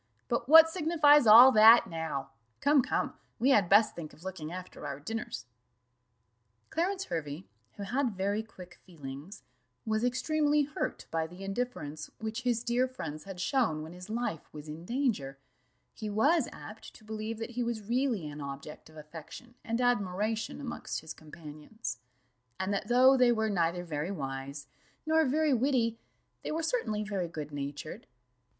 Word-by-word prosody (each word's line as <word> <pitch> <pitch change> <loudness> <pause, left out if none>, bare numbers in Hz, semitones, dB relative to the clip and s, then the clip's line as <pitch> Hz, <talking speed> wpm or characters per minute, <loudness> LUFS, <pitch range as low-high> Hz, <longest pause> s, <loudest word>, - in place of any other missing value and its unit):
But 240 +1 -1
what 325 +1 +10
signifies 305 -5 +4
all 240 +5 +10
that 225 0 +8
now? 160 -6 -4 0.3
Come, 285 -1 +4
come, - - -1 0.2
we 260 +4 +3
had 200 -8 +4
best 210 +2 +5
think 160 -3 -8
of 160 - -17
looking 175 -5 -6
after 180 -4 -8
our 140 -1 -5
dinners." 225 - -5 1.3
Clarence 370 +4 -1
Hervey, 145 - -5 0.3
who 200 - -7
had 245 +1 -1
very 200 +3 0
quick 180 -5 -13
feelings, 150 +3 -10 0.4
was 220 +1 0
extremely 295 +4 +2
hurt 295 +2 -4
by 160 -1 -1
the 180 +4 -11
indifference 195 -8 -4
which 220 +2 -4
his 240 -2 0
dear 245 +2 +1
friends 155 - -7
had 195 -2 -8
shown 190 - 0
when 160 +2 -9
his 180 +2 -11
life 220 -8 -3
was 150 0 -10
in 155 +3 -8
danger: 225 - -1 0.6
he 215 - -6
was 270 +8 +2
apt 215 +1 -11
to - - -16
believe 220 +1 -5
that 225 +1 -6
he 245 +1 -3
was 235 -2 -2
really 235 - 0
an 150 0 -8
object 140 +3 -8
of 155 - -16
affection 160 +10 -11
and 230 +1 -2
admiration 215 -2 0
amongst 275 -4 -5
his 160 - -8
companions; 155 +6 -8 0.6
and 190 +2 -1
that 200 +1 -2
though 255 +3 +6
they 250 -2 +5
were 220 -2 0
neither 175 -1 0
very 155 0 -3
wise, 140 -4 -5 0.4
nor 320 +1 +3
very 300 +2 +2
witty, 240 -3 +1 0.4
they - - -4
were 320 +1 -2
certainly 315 - -1
very 200 -4 -2
good 155 -3 -7
natured. 145 +1 -6
215 Hz, 160 wpm, -30 LUFS, 160-250 Hz, 1.3 s, what